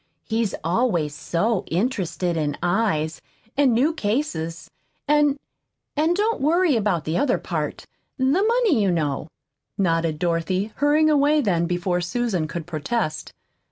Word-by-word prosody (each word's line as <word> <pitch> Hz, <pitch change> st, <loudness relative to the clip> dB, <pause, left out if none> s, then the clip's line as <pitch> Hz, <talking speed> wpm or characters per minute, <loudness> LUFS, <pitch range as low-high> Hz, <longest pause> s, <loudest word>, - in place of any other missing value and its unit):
He's 225 Hz, -2 st, -1 dB
always 170 Hz, -, +1 dB
so 195 Hz, +7 st, -1 dB
interested 180 Hz, -3 st, -1 dB
in 150 Hz, -3 st, -1 dB
eyes, 175 Hz, -7 st, 0 dB, 0.3 s
and 275 Hz, -2 st, +4 dB
new 265 Hz, +8 st, +2 dB
cases. 205 Hz, -, -2 dB, 0.4 s
And 295 Hz, -1 st, +3 dB, 0.6 s
and 315 Hz, +4 st, +2 dB
don't 430 Hz, 0 st, 0 dB
worry 325 Hz, +1 st, +3 dB
about 200 Hz, -8 st, 0 dB
the 160 Hz, +2 st, 0 dB
other 275 Hz, -2 st, +2 dB
part -, -, -4 dB, 0.3 s
the 260 Hz, -, -2 dB
money, 395 Hz, -, +3 dB
you 200 Hz, -, +2 dB
know," 150 Hz, -5 st, -1 dB, 0.5 s
nodded 165 Hz, -4 st, +1 dB
Dorothy, 180 Hz, +5 st, -1 dB
hurrying 300 Hz, +2 st, +3 dB
away 295 Hz, +1 st, +4 dB
then 175 Hz, -, +1 dB
before 175 Hz, 0 st, -1 dB
Susan 185 Hz, -3 st, -1 dB
could 165 Hz, +1 st, -5 dB
protest. 155 Hz, +1 st, -3 dB
205 Hz, 130 wpm, -23 LUFS, -, 0.6 s, and